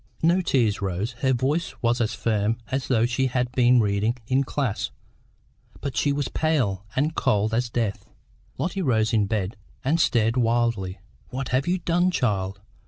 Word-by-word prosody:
No 175 +3 +4
tears 115 - +1
rose; 95 +4 -2
her 130 0 +2
voice 135 +7 0
was 120 +1 +2
as 115 0 0
firm 110 0 0
as 135 0 -1
though 115 -3 +3
she 125 +2 +1
had 125 -1 -1
been 125 0 +4
reading 105 +2 +1
in 130 +4 +2
class; 130 -5 -2 0.9
but 140 -2 -4
she 145 - +2
was 140 0 -1
pale 130 - 0
and 150 +4 +1
cold 105 -6 +1
as 120 +1 0
death. 115 -4 -2 0.5
Lotty 190 +3 -2
rose 115 -7 +1
in 105 -3 +3
bed 105 +1 -2 0.3
and 155 +5 +2
stared 115 -7 +2
wildly. 115 -5 +1 0.3
"What 130 +1 -4
have 130 +4 +1
you 180 +1 +2
done, 175 +1 +1
child? 100 - -1
120 Hz, 170 wpm, -25 LUFS, 110-135 Hz, 0.9 s, No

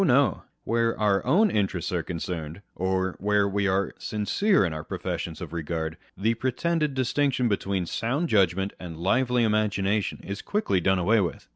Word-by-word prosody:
no; - - +3 0.2
where 115 0 0
our 100 -2 +2
own 195 +9 +4
interests 100 -2 -1
are - - 0
concerned, 85 +1 -5
or 95 0 -1
where 105 0 +2
we 100 0 0
are 95 +1 0
sincere 110 - +1
in 85 - -2
our 80 0 -5
professions - - -4
of - - -7
regard, 80 -1 -3 0.2
the 110 +5 +2
pretended 150 +5 -1
distinction 130 0 +1
between 100 -3 -1
sound 130 - -1
judgment 95 - +2
and 85 -3 -7
lively 125 +7 +2
imagination 105 -2 +1
is 100 +1 -5
quickly 150 - 0
done 95 +2 +3
away 105 +5 +3
with. 90 - -4
100 Hz, 160 wpm, -26 LUFS, 95-115 Hz, 0.2 s, own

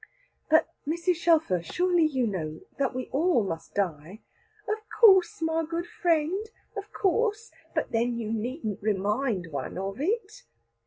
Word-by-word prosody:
"But, 315 +1 +5 0.2
Mrs. 340 +2 +1
Shelfer, 320 - +3
surely 350 - +2
you 260 -5 0
know 160 -7 -3 0.2
that 275 -2 0
we 255 -1 -3
all 310 - +3
must 165 -4 -5
die." 180 +1 -2 0.5
"Of 425 +1 -1 0.2
course, 380 -7 +6
my 320 0 +1
good 335 +2 -3
friend, 345 +2 +1 0.3
of 405 0 -6
course. 430 +3 0 0.2
But - - -1
then 235 +1 +1
you 225 -1 -3
needn't 225 - -3
remind 205 -2 0
one 140 +2 -4
of 195 +2 -4
it. 430 +6 -2
285 Hz, 145 wpm, -27 LUFS, -, 0.5 s, course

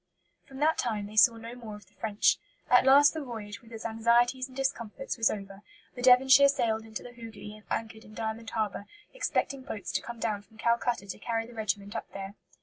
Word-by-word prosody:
From 270 - -11
that 310 +3 +2
time 215 -4 -1
they 210 +1 -10
saw 230 +2 +6
no 230 +1 -8
more 230 -4 -8
of 210 - -13
the - - -29
French. 215 -2 +1 0.3
At 250 +1 +6
last 285 +2 +7
the 315 -2 -4
voyage, 220 -4 -7
with 230 -1 -18
its 225 0 -8
anxieties 235 +3 +2
and 260 0 -14
discomforts, 270 -1 -3
was 225 -2 +3
over; 195 -1 -6 0.3
the 245 - -8
Devonshire 260 +2 +7
sailed 230 -6 0
into 220 -1 -7
the 245 - -10
Hoogli 225 -3 -10
and 215 - -16
anchored 225 -1 -4
in 215 - -15
Diamond 225 0 -4
Harbour, 210 -2 -3 0.3
expecting 280 - -1
boats 240 -6 -6
to - - -1
come 235 0 -8
down 210 -3 -1
from 220 +2 -23
Calcutta 235 -1 0
to 195 - -7
carry 225 +1 -2
the 240 - -13
regiment 205 -1 -3
up - - -5
there. 195 0 -6
225 Hz, 215 wpm, -29 LUFS, 215-250 Hz, 0.3 s, last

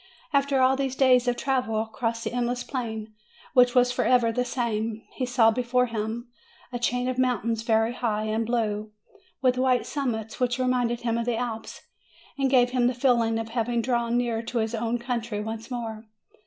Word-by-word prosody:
After 280 -1 +2
all 260 +1 +4
those 270 -1 -2
days 255 -2 +4
of 245 0 +1
travel 250 -5 0
across 230 +1 -3
that - - -3
endless 245 0 -1
plain, 220 -4 -5 0.4
which 245 -1 +5
was 245 0 +5
forever 245 -2 +3
the 250 +2 0
same, 225 -3 -2
he 255 - -2
saw 240 -2 +4
before 250 +2 +1
him 230 +1 -4 0.5
a 245 - -2
chain 245 +1 0
of 255 0 -2
mountains 230 -3 +1
very 225 0 +2
high 220 -4 -1
and 215 +1 0
blue, 215 -2 -1 0.5
with 255 -1 +3
white 255 -2 +2
summits, 225 -6 -3
which 245 -1 +1
reminded 250 -2 0
him 235 -1 0
of 230 - -2
the 240 -2 0
Alps, 225 -2 -5 0.5
and 275 -2 +1
gave 250 -2 +4
him 250 -1 +2
the 250 - 0
feeling 235 -3 +2
of 225 0 -4
having 235 0 -1
drawn 235 -1 +1
near 235 -2 0
to 235 +1 -4
his 220 0 0
own 230 +1 -1
country 235 -3 -3
once 220 +2 -5
more. 225 -3 -5
240 Hz, 185 wpm, -26 LUFS, 225-250 Hz, 0.5 s, which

